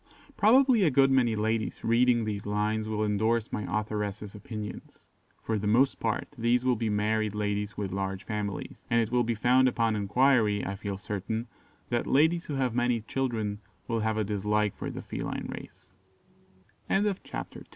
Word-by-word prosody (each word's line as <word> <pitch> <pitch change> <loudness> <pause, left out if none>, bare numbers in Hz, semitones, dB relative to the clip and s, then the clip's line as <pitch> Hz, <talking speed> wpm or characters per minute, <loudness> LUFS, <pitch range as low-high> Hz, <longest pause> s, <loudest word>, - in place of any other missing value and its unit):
Probably 250 +2 +5
a 165 - +5
good 135 0 +4
many 125 -4 +3
ladies 110 +1 -1
reading 120 0 +3
these 105 -1 -4
lines 105 +1 0
will 110 0 0
endorse 110 +2 +1
my 105 - -3
authoress's 105 -1 -3
opinions. 105 0 -8 0.4
For 110 -2 -1
the 105 - -2
most 125 +6 +3
part 110 -2 -1
these 120 +1 +1
will 125 -1 +3
be 115 -1 -1
married 105 0 0
ladies 105 0 -2
with 100 -3 -3
large 95 0 -3
families; 105 -3 -5
and 115 - +3
it 115 -1 0
will 125 -1 +3
be 115 0 -1
found 125 +4 +4
upon 115 -3 +1
enquiry, 105 0 +2
I 95 - -3
feel 100 -1 -4
certain, 105 +3 -3 0.4
that 120 -1 -1
ladies 160 +5 +3
who 145 - -4
have 130 -3 0
many 120 -1 +1
children 110 -4 -2 0.3
will 115 -1 0
hav 110 0 0
110 Hz, 145 wpm, -28 LUFS, 105-120 Hz, 0.4 s, Probably